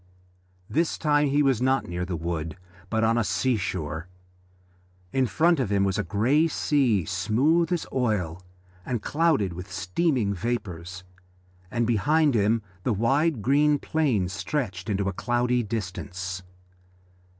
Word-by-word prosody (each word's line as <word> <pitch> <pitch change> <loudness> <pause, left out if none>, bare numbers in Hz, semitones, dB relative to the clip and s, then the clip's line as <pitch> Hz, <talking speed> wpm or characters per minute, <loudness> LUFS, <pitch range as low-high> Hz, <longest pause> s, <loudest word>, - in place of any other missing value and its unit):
This 165 +2 0
time 150 -1 +2
he 145 +2 +2
was 135 -4 +2
not 130 +1 +2
near 90 +1 -3
the 90 -1 -3
wood, 80 0 -4 0.3
but 110 0 +1
on 115 +1 +3
the 120 - +2
sea 130 +4 +1
shore. 85 -4 -3 1.1
In 130 -1 +2
front 165 +4 +3
of 125 -6 0
him 100 -1 +3
was 95 +1 0
a - - +1
grey 120 - +2
sea, 130 - +1
smooth 125 - +1
as 175 -2 0
oil 100 -9 -1 0.4
and 120 -1 -3
clouded 150 - +1
with 90 +2 -8
steaming 100 - 0
vapours, 90 -5 -4 0.7
and 120 +1 0
behind 145 +7 +3
him 110 0 +2 0.2
the 115 - 0
wide 135 - +1
green 145 +4 +4
plain 135 - 0
stretched 95 - -3
into 100 -1 0
a 100 - -1
cloudy 120 +4 +1
distance. 95 -4 -4
115 Hz, 140 wpm, -26 LUFS, 95-140 Hz, 1.1 s, green